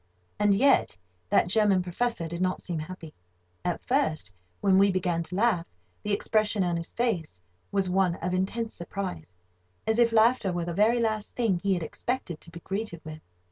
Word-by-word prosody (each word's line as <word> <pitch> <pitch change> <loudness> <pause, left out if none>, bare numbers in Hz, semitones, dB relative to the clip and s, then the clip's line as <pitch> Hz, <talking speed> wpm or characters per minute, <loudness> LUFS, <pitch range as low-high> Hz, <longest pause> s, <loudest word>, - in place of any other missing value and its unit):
And 205 -1 +4
yet 265 - +3 0.3
that - - +4
German 200 -1 +3
Professor 180 0 -1
did 170 +2 -5
not 185 0 0
seem 170 -3 -4
happy. 160 0 -8 0.5
At 175 -1 -2
first, 245 - 0 0.3
when 190 -1 +4
we 200 0 +5
began 180 -2 0
to 170 +2 -6
laugh, 200 -5 +2 0.3
the 210 - -3
expression 215 0 +1
of 175 -1 0
his 170 0 -5
face 185 - -1 0.3
was 195 -2 +1
one 180 -1 +2
of 180 +1 -3
intense 215 +5 -1
surprise, 170 - -5 0.5
as 220 +1 +1
if 235 -1 +5
laughter 225 -2 +4
were 175 -1 -2
the 175 - -3
very 220 +6 +3
last 215 -2 -1
thing 220 -7 +1
he 195 0 +1
had 175 - -3
expected 180 0 -4
to - - -7
be 170 0 -10
greeted 195 -3 -4
with. 155 0 -8
190 Hz, 180 wpm, -27 LUFS, 170-220 Hz, 0.5 s, we